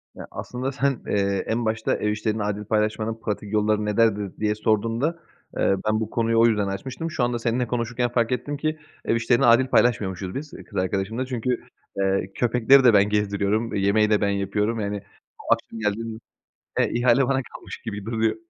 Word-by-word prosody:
Ya, - - -9
aslında 130 +2 -4
sen, 140 -2 0
eee, 100 -1 0
en 115 +1 -1
başta 110 0 0
"Ev 105 - -1
işlerini 105 0 -1
adil 105 0 -3
paylaşmanın 110 +1 -1
pratik 105 -1 -4
yolları 105 0 +2
nelerdir?" 105 -2 +1
diye 105 0 +1
sorduğunda, 115 +10 0 0.4
eee, 95 - +3
ben 110 0 +2
bu 110 -1 -3
konuyu 115 -1 +1
o 115 - +6
yüzden 105 -3 +2
açmıştım. 130 - -4
Şu 135 -6 -1
anda 120 0 0
seninle 120 +1 0
konuşurken 120 +1 -1
fark 120 -1 0
ettim 140 +4 -2
ki 155 +1 -1 0.3
ev - - +2
işlerini 120 +3 +2
adil 120 +3 +5
paylaşmıyormuşuz 95 -7 +1
biz 150 +2 -5 0.2
kız 100 - -7
arkadaşımla 95 +6 -1
çünkü, 125 -1 -2 0.4
eee, 95 0 0
köpekleri 125 +3 +4
de 120 -3 +6
ben 100 0 +5
gezdiriyorum, 105 +2 0
yemeği 100 +2 +3
de 105 -1 +3
ben 100 - +2
yapıyorum, 100 +3 -1
yani, 100 -1 -3 0.3
o - - +2
akşam 115 - -6
geldiğimde 110 +1 -2 0.6
e, - - +3
ihale 125 +2 +4
bana 135 -1 +1
kalmış - - -8
gibi 100 0 -5
duruyor. 110 -1 0
110 Hz, 180 wpm, -24 LUFS, 105-120 Hz, 0.6 s, o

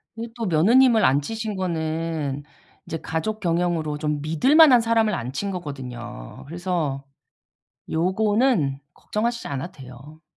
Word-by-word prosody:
근데 230 +1 -6
또 235 -2 -3
며느님을 220 +7 +5
앉히신 210 - 0
거는 160 -5 -2 0.4
이제 160 - -4
가족 190 +8 -3
경영으로 170 -4 0
좀 150 -1 -2
믿을 165 - +2
만한 295 -7 +8
사람을 225 -1 +2
앉힌 140 +7 -3
거거든요. 125 - -7
그래서 165 -5 -3 0.9
요거는 190 - +1
걱정하시지 235 +7 -3
않아도 140 +5 -4
돼요. 135 +4 -13
165 Hz, 290 characters per minute, -23 LUFS, 145-215 Hz, 0.9 s, 만한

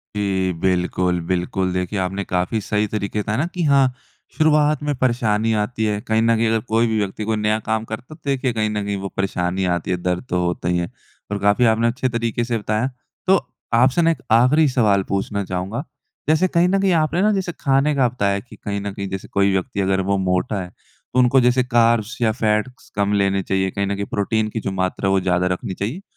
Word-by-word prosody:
जी। 95 -3 0
बिल्कुल, 90 -1 +1
बिल्कुल 90 +1 -1
देखिए 90 +2 -2
आपने 95 +2 -2
काफ़ी 90 +5 -1
सही 105 +1 0
तरीके 105 0 -3
बताया 110 +2 -1
ना 155 - +1
कि 180 - -2
हाँ 140 -4 +4 0.4
शुरुआत 150 -1 +3
में 145 0 0
परेशानी 115 -3 +1
आती 110 0 -2
है 105 -1 0
कहीं 110 +1 +1
न 115 0 +3
कहीं 115 0 +1
अगर 115 0 +2
कोई 115 +1 +3
भी 110 -1 0
व्यक्ति 100 +1 -3
कोई 110 0 0
नया 105 0 +1
काम 110 0 0
करता 120 +7 -7
तो 155 - -25
देखिए 135 -3 0
कहीं 110 -1 0
न 105 -1 -2
कहीं 100 - -2
वो 100 - -4
परेशानी 95 -1 -1
आती 85 +1 -4
है 90 - +1
दर्द 90 +4 -1
तो 90 - 0
होता 85 0 -2
ही 90 - +1
है। 85 0 -2 0.4
और 105 - -1
काफ़ी 100 +5 +3
आपने 115 +1 +3
अच्छे 130 +2 -1
तरीके 115 0 -1
से 120 -1 -1
बताया 110 +3 -1 0.4
तो 190 +1 +6 0.4
आपसे 130 +7 +4
ना 165 0 +4
एक 135 -5 -4
आख़िरी 130 +7 +5
सवाल 105 -7 +2
पूछना 100 +1 -1
चाहूँगा 95 +7 -3 0.5
जैसे 160 +4 +4
कहीं 170 0 +2
न 195 +1 +2
कहीं 195 -1 +3
आपने 165 +2 +1
ना 215 - +4
जैसे 190 -3 -1
खाने 135 +1 +2
का 130 -3 +3
बताया 100 -5 0
कि 115 +1 -14
कहीं 100 -1 -4
न 100 0 -4
कहीं 100 0 -5
जैसे 95 0 -5
कोई 100 0 +2
व्यक्ति 95 +1 -2
अगर 95 0 +1
वो 100 - +2
मोटा 95 +2 0
है 90 - -7
तो 125 - -7
उनको 125 +2 +5
जैसे 125 +1 +3
कार्ब्स 120 -2 +2
या 110 - +3
फ़ैट्स 110 +2 -1
कम 100 0 +1
लेने 100 -1 +2
चाहिए 95 0 0
कहीं 100 -1 -2
न 100 - -1
कहीं 100 0 -3
प्रोटीन 110 +2 0
की 110 - -4
जो 100 - -3
मात्रा 95 0 -1
है 95 - +2
वो 95 - +4
ज़्यादा 90 0 +1
रखनी 90 +1 -3
चाहिए। 115 - -4
105 Hz, 225 wpm, -21 LUFS, 95-125 Hz, 0.5 s, तो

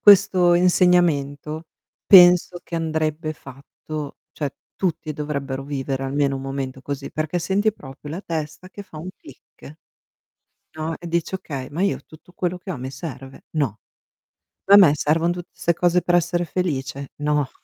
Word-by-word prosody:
questo 185 -3 +6
insegnamento, 165 -4 +2 0.4
penso 180 -1 +7
che 170 - -5
andrebbe 155 -1 -1
fatto, 140 +2 -9
cioè, 145 -3 -2 0.3
tutti 165 -4 -2
dovrebbero 140 -2 -4
vivere 135 -1 -3
almeno 140 0 0
un 135 - -6
momento 135 -1 -4
così, 140 0 -5
perché 155 +3 -2
senti 200 +5 +1
proprio 145 -5 -11
la 175 +5 -4
testa 155 0 -5
che 205 +1 -9
fa 160 -5 -11
un 170 - -7
click, 155 +3 -15 1.0
no, 160 +1 -3
e 175 - -9
dici: 170 +2 -1
"Okay, 140 -8 -6
ma 165 +5 -3
io 200 - +1
tutto 160 +3 -17
quello 180 0 -2
che 185 +1 -7
ho 155 - -5
mi 130 +1 -6
serve? 135 -2 -9
No. 115 -8 0 0.9
Ma 200 - +9
a - - +10
me 185 -8 +8
servono 165 +4 +1
tutte 175 0 -8
'ste 170 - 0
cose 175 +1 +2
per 175 - +2
essere 175 0 +1
felice? 140 -6 -3
No". 150 -2 0
155 Hz, 160 wpm, -22 LUFS, 140-175 Hz, 1.0 s, a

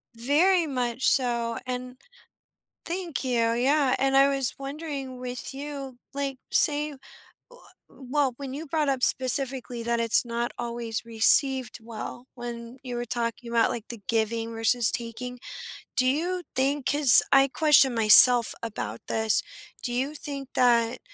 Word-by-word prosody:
Very 320 +9 +1
much 250 -2 -2
so, 235 -3 0
and 250 0 -6 0.9
Thank 345 -2 -5
you. 235 -3 0
Yeah, 265 +2 +1
and 270 0 +1
I 275 +1 +4
was 270 -3 -1
wondering 275 -2 -7
with 250 -1 -7
you, 275 -2 -8 0.2
like, 275 -1 -4
say, 300 0 +3
wha - - -12 0.9
w 265 - -15
well, 285 -4 0
when 275 -1 -8
you 310 +3 -7
brought 300 -1 -1
up 265 -2 -3
specifically 255 -1 +2
that 235 0 -2
it's 230 -1 +3
not 235 0 -4
always 235 -2 -4
received 250 +3 +2
well, 230 +2 -9
when 240 0 -9
you 250 -2 -6
were 240 0 -5
talking 235 0 -4
about, 230 -1 +2
like, 230 -1 -7
the 235 -4 -9
giving 225 0 -2
versus 225 -1 +2
taking. 245 +1 -6 0.6
Do 255 - +2
you 345 +7 -1
think- 275 +1 -1
'cause 285 -4 +8
I 270 0 +5
question 275 -3 +3
myself 230 +2 +7
about 115 - -6
this- 220 -1 +2 0.4
do 245 - -5
you 265 +4 -2
think 280 -3 -8
that 235 -2 +1
255 Hz, 150 wpm, -25 LUFS, 235-275 Hz, 0.9 s, cause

